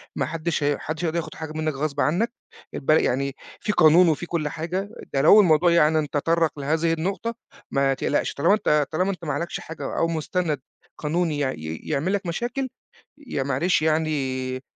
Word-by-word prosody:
ما 140 - 0
حدش 160 +1 -2
هي 145 0 +3
ما - - -6
حدش 155 +2 -4
هيقدر 165 +1 -1
ياخد 170 - -4
حاجة 160 -1 -6
منك 155 -1 -1
غصب 140 0 -2
عنك، 200 +11 +1 0.4
الب - - -6
يعني 140 -3 +2 0.2
في 210 - -1
قانون 170 0 +6
وفي 160 +3 -1
كُلّ 165 -4 -2
حاجة، 180 +6 -3 0.2
ده 135 - +2
لو 205 +8 +8
الموضوع 170 -1 +4
يعني 155 -2 +3
تطرَّق 160 0 0
لهذه 160 +3 +1
النقطة، 195 +8 -2 0.4
ما 135 0 +2
تقلقش 145 - -1
طالما 145 +8 +3
أنت 150 -9 +2
طالما 185 +5 +1
أنت 180 -2 -8
ما 150 - -1
عليكش 170 - -3
حاجة 160 +1 -6
أو 165 - +2
مستند 160 -2 -1 0.4
قانوني 160 0 0
يع 135 -2 +1
ي 80 -3 -6
يعمل 155 +6 -1
لك 200 -1 -1
مشاكل، 245 +9 -2 0.6
يع 135 - -2
معلش 170 +5 +1
يعني 135 -5 -1
155 Hz, 185 wpm, -24 LUFS, 145-175 Hz, 0.6 s, لو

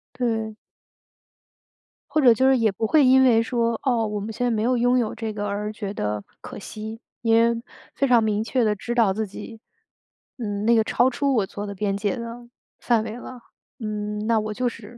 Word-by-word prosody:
对。 225 -3 -2 1.5
或 310 - +2
者 245 -3 +7
就 260 +3 +2
是 265 - +4
也 220 -3 +2
不 220 +3 -2
会 295 0 +5
因 265 +1 +6
为 230 -3 +5
说， 230 -1 0
哦， 235 -5 +1
我 210 0 -3
们 215 +2 -5
现 245 - -2
在 - - +2
没 215 -1 0
有 250 +1 +2
拥 245 +1 +3
有 225 -3 0
这 220 -2 -4
个， 205 0 -4
而 210 +1 -3
觉 205 -1 -5
得 105 - -3 0.2
可 - - -9
惜。 220 +2 -7 0.2
因 225 -1 +2
为 230 0 +3 0.3
非 275 - +1
常 240 -3 +5
明 215 -1 0
确 245 +1 0
地 210 -1 +2
知 240 +4 -4
道 225 -5 +4
自 215 +1 -2
己， 225 +3 -10 0.8
嗯， 205 -3 -3
那 235 - +5
个 220 - +4
超 255 - +3
出 275 +1 0
我 205 -4 +2
做 205 +2 -7
的 200 - -6
边 200 0 -1
界 205 +5 -1
了， 235 0 -8 0.3
范 230 -3 +2
围 225 +1 -6
了， 245 -1 -10 0.4
嗯， 210 -1 -4
那 225 -1 +3
我 215 0 -3
就 245 +2 0
是 230 +1 -12
225 Hz, 230 characters per minute, -24 LUFS, 210-240 Hz, 1.5 s, 者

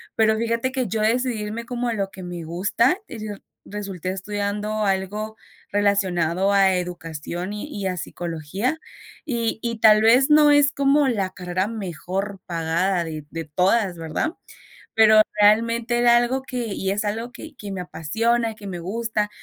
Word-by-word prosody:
pero 220 0 +4
fíjate 230 +3 -1
que 260 -3 -1
yo 220 +3 -2
decidí 230 0 +1
irme 220 +3 -5
como 245 0 -3
a 235 - 0
lo 200 -3 -2
que 190 - -10
me 175 -1 -6
gusta, 190 - +1
y - - -8
resul 205 -1 -8 0.2
resulté 195 -3 -5
estudiando 205 +2 -2
algo 205 +3 -2 0.3
relacionado 195 -2 +1
a 195 -1 +4
educación 175 +1 -4
y 210 +7 -5
y 200 -8 -3
a 185 - -1
psicología, 175 - -3 0.5
y 235 -5 -2
y 230 -1 -3
tal 215 -1 +7
vez 245 +5 +5
no 300 0 +7
es 290 -1 +5
como 280 +1 +3
la 205 -7 0
carrera 185 0 -2
mejor 195 -1 -4
pagada 170 +2 0
de 155 -2 -6
de 165 0 -5
todas, 185 +4 +1
¿verdad? 165 - -2 0.6
Pero 220 -1 +7 0.2
realmente 230 +3 +3
era 240 0 +6
algo 240 +2 +1
que 250 -3 -4
y 195 -2 -2
es 205 +2 -1
algo 225 +4 -3
que 315 +4 -10
que 205 -6 -8
me 190 -2 -4
apasiona, 225 +8 0
que 210 -1 -11
me 185 -3 -5
gusta. 210 +4 -2
205 Hz, 165 wpm, -23 LUFS, 185-230 Hz, 0.6 s, tal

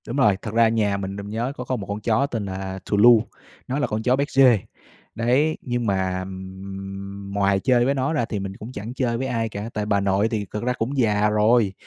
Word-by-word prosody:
Đúng 120 - -4
rồi. 105 -8 +4
Thật 105 - -6
ra 115 0 +5
nhà 105 -3 +1
mình, 95 0 -4
mình 100 0 -7
nhớ 115 +5 -2
có 125 - -4
có 130 +1 -2
một 105 -5 -6
con 100 +1 -3
chó 115 +4 +2
tên 115 -6 -3
là 95 0 -5
Thù 100 - 0
Lu, 115 +1 +7 0.4
nó 135 +3 -1
là 145 - +1
con 110 +1 -3
chó 125 +1 +3
béc-giê. 135 -3 +4 0.6
Đấy, 130 +7 +2
nhưng 120 -1 -2
mà, 95 -2 0
ừm, 95 +1 -6 0.3
ừm, 100 0 -7
ngoài 100 -1 +2
chơi 120 +3 +3
với 135 - +2
nó 135 +3 0
ra 145 -7 +1
thì 105 - -4
mình 95 0 -6
cũng 110 +4 -8
chẳng 110 0 -6
chơi 120 -3 -1
với 130 +2 -2
ai 115 -3 -1
cả. 105 +1 -5
Tại 105 -1 -2
vì - - -6
bà 100 -1 +3
nội 100 +2 +2
thì 110 -3 -2
cực 105 +4 -6
ra 125 +1 +1
cũng 125 +4 -3
già 105 -4 +3
rồi, 105 -1 +3
110 Hz, 255 wpm, -23 LUFS, 100-120 Hz, 0.6 s, Lu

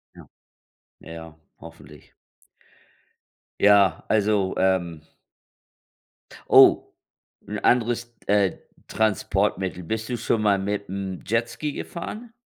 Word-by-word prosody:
Ja. - - -14 0.7
Ja 80 - -11
ja, 80 -1 -10 0.3
hoffentlich. - - -15 1.5
Ja, 100 -4 +4
also, 105 -3 +1
ähm 85 -5 0 1.4
Oh, - - +6 0.5
'n - - -4
anderes, 120 0 0
äh, 100 -1 +2 0.3
Transportmittel. 95 -4 -1
Bist 110 +6 -4
du 125 - -2
schon 115 -1 -1
mal 100 -2 +3
mit 100 +1 -3
dem 95 -1 -5
Jetski 120 +6 -2
gefahren? 215 +7 -7
100 Hz, 95 wpm, -24 LUFS, 95-115 Hz, 1.5 s, Oh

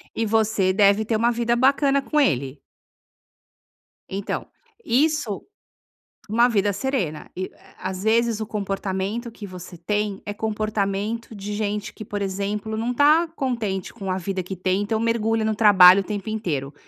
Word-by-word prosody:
E 225 - 0
você 215 -3 +2
deve 200 +1 +4
ter 220 0 0
uma 230 +2 +3
vida 235 0 0
bacana 275 +2 +3
com 300 +2 0
ele. 135 - 0 1.5
Então, 195 +1 -4 0.4
isso 280 - +1 0.9
uma 235 +3 +4
vida 205 -4 +1
serena 200 - -2
e 185 +1 -4 0.3
a 185 - -4
às 190 0 -6
vezes 225 0 +2
o 220 - -3
comportamento 200 +2 -3
que 215 - -9
você 180 -1 -10
tem 205 +3 -2
é 205 - -4
comportamento 215 +1 -2
de 200 0 -6
gente 210 0 -3
que, 215 - -9
por 205 0 -4
exemplo, 200 +3 -3
não 235 +3 -1
tá 300 +6 +4
contente 225 - -2
com 195 -5 -6
a 185 - -1
vida 190 +1 -3
que 190 +2 -6
tem. 185 +2 0
Então 220 +2 -1
mergulha 225 -1 +1
no 220 0 0
trabalho 195 -3 +8
o - - -6
tempo 205 +1 -5
inteiro. 155 -11 -3
210 Hz, 160 wpm, -23 LUFS, 195-230 Hz, 1.5 s, trabalho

